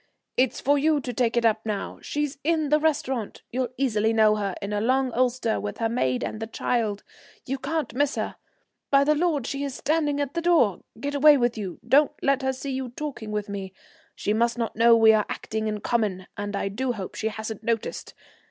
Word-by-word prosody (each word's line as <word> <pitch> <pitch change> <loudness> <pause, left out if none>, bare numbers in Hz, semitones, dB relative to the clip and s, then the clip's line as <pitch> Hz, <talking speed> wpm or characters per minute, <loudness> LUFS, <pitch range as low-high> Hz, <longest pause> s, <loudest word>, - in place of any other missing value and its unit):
It's 255 -1 +1
for 285 +2 +2
you 305 +1 +3
to 250 -2 -5
take 240 0 +1
it 235 - +2
up 220 -1 +2
now. 210 -3 -4
She's 295 -1 -3
in 315 -1 +1
the 300 +1 +4
restaurant. 270 -7 -1
You'll 250 0 -1
easily 225 -4 +1
know 215 -1 +5
her, 200 -3 -2
in 200 +1 -4
a 205 - 0
long 260 +3 +2
ulster, 245 -2 +1
with 205 0 -5
her 225 -1 0
maid 130 - 0
and 215 - -4
the 225 - -4
child. 220 -3 -1 0.4
You 270 +1 -3
can't 315 +1 -2
miss 285 +3 +1
her. - - -3 0.5
By 275 0 +5
the 300 +2 +3
Lord, 305 -4 0
she 275 0 -3
is 275 -2 -4
standing 295 -2 0
at 285 -1 -2
the 340 - -1
door! 320 - +3 0.2
Get 285 +3 -3
away 290 +1 +7
with 240 -2 +1
you, 195 -5 -5
don't 285 +4 +5
let 275 0 +2
her 265 0 +1
see 265 +1 -5
you 260 -1 -3
talking 250 -4 -6
with 210 0 -2
me. 195 -2 -6 0.4
She 210 - -1
must 235 +2 +1
not 230 -2 -2
know 230 +1 +6
we 220 -1 +7
are 215 -1 +2
acting 220 0 -3
in 210 -1 -3
common, 205 -6 0
and 205 0 -4
I 195 - -1
do 245 +5 -2
hope 195 -5 -6
she 220 - -2
hasn't 220 0 -5
noticed. 230 -1 -3
240 Hz, 215 wpm, -25 LUFS, 215-280 Hz, 0.5 s, away